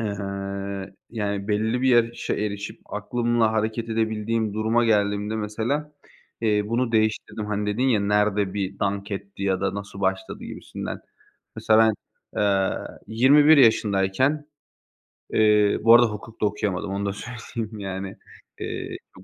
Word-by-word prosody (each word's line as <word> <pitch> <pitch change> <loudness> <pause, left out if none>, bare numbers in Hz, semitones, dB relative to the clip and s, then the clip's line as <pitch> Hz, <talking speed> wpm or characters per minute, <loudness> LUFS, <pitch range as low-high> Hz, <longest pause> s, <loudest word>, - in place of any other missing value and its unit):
ııı, 100 -2 -4 0.2
yani, 100 -3 -3
belli 110 +3 +1
bir 130 - +3
yaşa 120 -1 +2
erişip 105 -1 -4
aklımla 115 +1 0
hareket 110 +1 -1
edebildiğim 110 -1 -1
duruma 110 +2 +2
geldiğimde 105 0 +1
mesela, 115 +8 -2 0.5
eee, 105 -2 +2
bunu 115 +2 0
değiştirdim. 110 -1 0
Hani, 105 0 -2
dedin 125 - -1
ya, 115 -5 +3
"Nerede 105 -1 +1
bir 95 -1 -3
dank 100 0 -2
etti?" 100 0 -6
ya 95 -1 +1
da 95 - -1
"Nasıl 100 -1 -7
başladı?" 95 -1 -2
gibisinden. - - -6 0.6
Mesela 110 0 +3
ben, 110 -1 +5 0.5
eee, 100 -2 +2 0.3
21 145 +7 +6
yaşındayken 115 +4 +3 0.9
Eee, 105 -1 +4
bu 115 +1 +8
arada 120 0 +7
hukuk 110 +1 -9
da - - +3
okuyamadım, 100 -2 -2
onu 100 +1 -2
da 100 - -1
söyleyeyim, 115 0 -6
yani. 95 -1 -5 0.5
Iıı, - - -4 0.2
çok 95 - -14
105 Hz, 135 wpm, -24 LUFS, 100-115 Hz, 0.9 s, bu